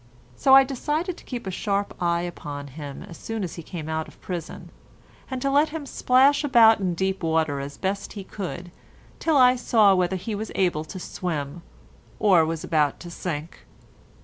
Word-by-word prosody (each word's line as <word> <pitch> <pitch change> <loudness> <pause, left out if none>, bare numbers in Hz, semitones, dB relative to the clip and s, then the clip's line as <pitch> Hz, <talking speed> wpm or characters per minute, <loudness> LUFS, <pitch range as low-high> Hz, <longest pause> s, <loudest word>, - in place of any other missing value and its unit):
So 265 - +6
I 270 - +9
decided 300 +7 -2
to - - -14
keep 245 -4 -6
a 190 - -3
sharp 200 +2 -1
eye 170 -1 +1
upon 145 -5 -6
him 140 0 -8
as 170 - -11
soon 225 -2 -4
as 175 - -4
he 170 - -7
came 160 -1 -7
out 160 0 -2
of - - -17
prison, 175 -3 -6 0.6
and 260 -1 -3
to 275 - +1
let 290 +3 +4
him 310 -1 -6
splash 270 +2 +3
about 230 -6 +6
in 185 -3 -1
deep 190 +2 -1
water 160 -3 +1
as 140 0 -6
best 195 +1 -3
he 200 - -7
could 180 -3 -6 0.5
till 320 -3 +2
I 250 -1 +6
saw 220 -5 +4
whether 185 0 +1
he 190 +4 -4
was 210 +1 -4
able 175 -5 +1
to 185 - -8
swim, 170 -4 -4 0.6
or 190 -6 +5
was 160 0 -3
about 150 -3 +1
to 175 - -9
sink. 165 -2 -5
185 Hz, 190 wpm, -24 LUFS, 160-240 Hz, 0.6 s, I